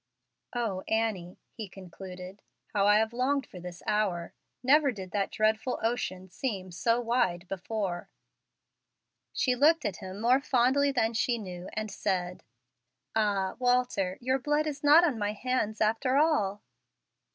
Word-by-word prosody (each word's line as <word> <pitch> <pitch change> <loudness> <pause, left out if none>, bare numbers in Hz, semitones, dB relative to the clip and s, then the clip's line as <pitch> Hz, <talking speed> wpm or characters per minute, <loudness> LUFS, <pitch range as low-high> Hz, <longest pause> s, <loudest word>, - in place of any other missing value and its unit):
"O, 220 -6 -1
Annie!" 215 -6 -1
he 215 -4 -7
concluded, 185 +1 -10 0.3
"how 200 -1 +3
I 210 0 +6
have 220 +1 +1
longed 265 +3 +1
for 180 - -11
this 175 0 -9
hour! 195 -5 0 0.3
Never 280 +2 +5
did 190 -5 -8
that 200 -2 0
dreadful 220 +4 0
ocean 190 -5 -2
seem 185 -1 -4
so 230 +8 +1
wide 230 -7 0
before." 190 -1 -3 1.2
She 255 - +1
looked 305 +6 +4
at 185 - -2
him 190 +1 -8
more 245 +4 +4
fondly 275 +2 +3
than 230 -3 +1
she 235 +2 +1
knew, 180 -4 -7
and 215 -1 -3
said, 180 -2 -2 0.7
"Ah, 200 -3 +1
Walter! 245 -7 +1
your 260 +2 +1
blood 295 +3 +1
is 295 -1 -4
not 300 +4 +7
on 285 -10 +1
my 205 0 -1
hands 220 -2 -1
after 225 +5 +2
all." 215 -10 +2
220 Hz, 145 wpm, -29 LUFS, 190-250 Hz, 1.2 s, not